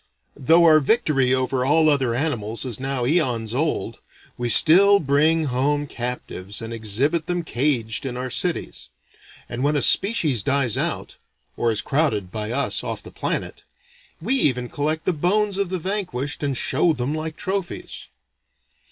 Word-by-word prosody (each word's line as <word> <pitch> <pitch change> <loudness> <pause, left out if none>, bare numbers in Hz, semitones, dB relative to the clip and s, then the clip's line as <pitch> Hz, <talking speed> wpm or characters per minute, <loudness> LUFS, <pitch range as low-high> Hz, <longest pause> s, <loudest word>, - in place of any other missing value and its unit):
Though 160 +5 +4
our 155 -1 +7
victory 145 - +1
over 130 0 0
all 155 +4 +3
other 135 -6 +2
animals 115 -6 -2
is 120 -5 -4
now 135 -2 -2
aeons 120 -7 0
old, 150 +5 -2 0.4
we 120 0 -3
still 195 - +6
bring 155 +2 +2
home 145 +2 0
captives 120 -7 -5
and 115 0 -6
exhibit 125 +9 -1
them 175 -1 -2
caged 120 -6 -1
in 125 -1 -5
our 130 0 -4
cities. 170 - -3 0.6
And 120 +2 -5
when 150 +1 +1
a 145 - +1
species 165 - +2
dies 130 -1 +2
out - - -3 0.4
or 115 - 0
is 105 -1 -1
crowded 110 - 0
(by 105 +1 -4
us), 135 +3 -1
off - - -5
the - - -11
planet - - -4 0.6
we 215 +11 -1
even 125 - +1
collect 155 +2 -2
the 185 - +1
bones 195 +5 0
of 200 -3 -1
the 185 - -2
vanquished 170 -7 -3
and 140 -3 -1
show 170 +5 +2
them 125 +1 -3
like 155 0 -5
trophies. 190 -2 -5
140 Hz, 160 wpm, -22 LUFS, 125-160 Hz, 0.6 s, our